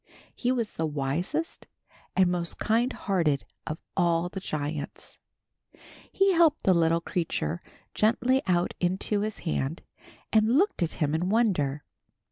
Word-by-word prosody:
He 245 - 0
was 235 -4 -1
the 160 - -1
wisest 160 - -2 0.5
and 190 -1 +5
most 170 -1 +1
kind 235 +4 +1
hearted 165 - 0 0.2
of 155 - -3 0.2
all 170 -1 +2
the 190 - -5
giants. 150 -3 -4 0.9
He 390 0 +3
helped 330 -3 +4
the 190 - +5
little 165 -1 +3
creature 170 -1 -2 0.3
gently 245 +4 +2
out 175 -1 +1
into 190 +3 0
his 215 0 -3
hand, 160 0 -2 0.5
and 220 +3 +4
looked 390 - +2
at 170 - 0
him 150 -1 0
in 175 +3 0
wonder. 175 - +1
180 Hz, 135 wpm, -27 LUFS, 160-225 Hz, 0.9 s, and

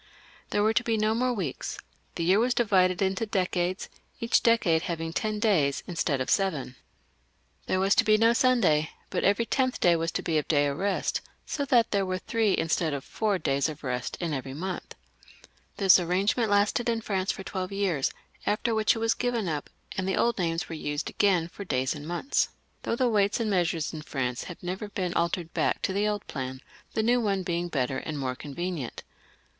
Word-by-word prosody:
There 205 - +1
were 220 +1 +3
to 235 - +2
be 230 -2 0
no 215 +1 +2
more 250 +2 +1
weeks, 185 - -3 0.4
the 170 - -2
year 185 +5 +4
was 245 +2 +2
divided 190 -5 +3
in 190 0 +2
decades, 185 -3 -1 0.3
each 230 -1 +3
decade 205 -9 +3
having 165 -1 -3
ten 215 +2 -1
days 175 -11 +2
instead 165 -5 -1
of 130 - -2
seven. 155 -10 0 0.9
There 185 - +1
was 195 +1 +4
to - - +4
be 215 0 +4
no 225 +1 +5
Sunday, 215 -12 +3 0.2
but - - -1
every 205 +4 +3
tenth 255 +1 0
day 175 -1 +5
was 165 0 -1
to - - -2
be 160 -2 +1
a - - +1
day 145 -1 +2
of 140 0 -2
rest, 200 -1 0 0.2
so 285 - -2
that 240 -4 +3
there 200 -1 +2
were 185 -1 -1
three 220 +1 +1
instead 165 -2 0
of 135 - -5
four 210 -3 0
days 140 -2 0
of 155 0 -8
Jt 125 -2 -3
in 170 -3 -2
everymontL 145 +7 -4 0.8
Thisarrange 185 0 +4
ment 230 -3 +1
lasted 205 +4 +2
in 230 -1 0
France 195 -3 -1
for 190 - -7
twelve 185 0 -4
years, 190 -8 0 0.4
after 215 +3 +1
which 220 +1 +3
it - - -3
was 225 0 +2
given 240 -5 -1
up, 150 -3 -3 0.3
and 185 - -2
the 190 - 0
old 235 -3 +2
names 165 -1 -1
were - - -7
used 145 -2 -3
again 185 -5 +2
for 190 +3 -8
days 130 -7 0
ahd 150 -1 -8
months, 175 - 0 0.3
though - - -1
the 250 +1 +2
weights 205 -2 +2
and 220 -2 0
measures 170 -4 0
in 155 - -5
France 125 -5 -3
have 180 - -9
never 190 +4 -4
been 185 -3 -2
altered 170 0 -1
back - - +1
to 190 - 0
the 205 +2 +1
old 210 -1 -2
plan, 130 -2 -5 0.4
the 220 - +2
new 245 +2 +3
one 200 -4 0
being 175 0 -1
better 130 -4 -1
and 155 -2 -5
more 130 -2 -2
convenient. 150 +1 -5
185 Hz, 205 wpm, -27 LUFS, 160-215 Hz, 0.9 s, no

